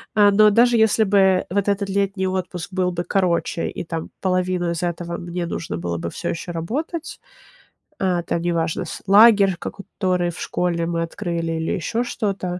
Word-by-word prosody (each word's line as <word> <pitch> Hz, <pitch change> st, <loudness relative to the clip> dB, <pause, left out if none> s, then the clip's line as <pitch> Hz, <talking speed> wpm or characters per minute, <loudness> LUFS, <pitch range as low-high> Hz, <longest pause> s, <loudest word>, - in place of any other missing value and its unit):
а, 205 Hz, -1 st, +6 dB
но 210 Hz, +1 st, +6 dB
даже, 235 Hz, +3 st, +4 dB
если 220 Hz, 0 st, +4 dB
бы 190 Hz, -2 st, +3 dB
вот 200 Hz, +1 st, 0 dB
этот 200 Hz, 0 st, 0 dB
летний 195 Hz, -1 st, 0 dB
отпуск 185 Hz, 0 st, -4 dB
был 180 Hz, -1 st, +1 dB
бы 175 Hz, 0 st, -3 dB
короче, 175 Hz, -3 st, 0 dB
и -, -, -3 dB
там 165 Hz, -1 st, -5 dB
половину 185 Hz, -1 st, 0 dB
из 170 Hz, -, -3 dB
этого 170 Hz, 0 st, -3 dB
мне 175 Hz, 0 st, -4 dB
нужно 170 Hz, 0 st, -4 dB
было 85 Hz, 0 st, -3 dB
бы 85 Hz, -, -4 dB
всё 170 Hz, -, -5 dB
еще 170 Hz, +2 st, -4 dB
работать 285 Hz, -, -4 dB, 0.8 s
А, 180 Hz, -2 st, +1 dB
это 170 Hz, -, -2 dB
неважно. 170 Hz, -2 st, -1 dB
С -, -, -8 dB
лагерь, 200 Hz, -2 st, +6 dB
ко -, -, -4 dB
который 185 Hz, -3 st, -2 dB
в 170 Hz, -, -12 dB
школе 170 Hz, -2 st, -1 dB
мы 170 Hz, -1 st, -1 dB
открыли, 165 Hz, -1 st, -3 dB
или -, -, -2 dB
еще 225 Hz, +7 st, -1 dB
что-то. 195 Hz, -6 st, -3 dB
185 Hz, 180 wpm, -21 LUFS, 170-200 Hz, 0.8 s, а